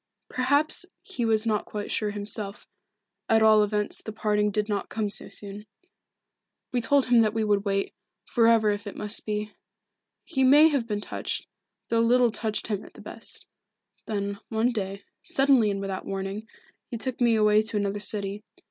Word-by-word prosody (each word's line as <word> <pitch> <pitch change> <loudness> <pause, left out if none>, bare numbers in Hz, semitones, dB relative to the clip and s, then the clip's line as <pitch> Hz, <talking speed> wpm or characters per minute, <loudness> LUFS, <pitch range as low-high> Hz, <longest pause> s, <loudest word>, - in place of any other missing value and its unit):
Perhaps 285 +7 +1 0.2
he 255 -12 -3
was 220 0 +2
not 215 -2 0
quite 205 -1 -5
sure 215 - 0
himself, 205 0 -4 0.6
at 225 0 +4
all 215 -1 +6
events 210 0 -1
the 220 - -7
parting 210 -1 +1
did 210 +1 -1
not 205 -2 -2
come 215 -2 -2
so - - -1
soon. 205 +1 -5 1.0
We 245 - 0
told 275 +4 +3
him 240 -2 +5
that 215 -1 +1
we 225 - +1
would 205 -1 +1
wait, 195 0 -1 0.3
for 230 -2 +3
ever 225 -2 +4
if 205 0 -4
it 205 - -7
must 210 +1 -1
be. 210 0 -3 0.7
He 265 -6 0
may 295 +5 +7
have 275 -6 -1
been 210 -2 -2
touched, - - -3 0.4
though 230 - +2
little 240 +1 +4
touched 215 0 -2
him 205 -3 -3
at - - -14
the - - -13
best. - - -4 0.6
Then, 200 -1 -3
one 225 +2 +1
day, 200 -3 -4 0.2
suddenly 270 -5 +3
and 200 -1 -2
without 195 -1 -4
warning, 195 +3 -4 0.4
he 235 - -4
took 250 +3 -4
me 235 -2 +4
away 210 0 +4
to 220 0 -3
another 205 0 -1
city. 200 0 -2
215 Hz, 180 wpm, -26 LUFS, 205-230 Hz, 1.0 s, may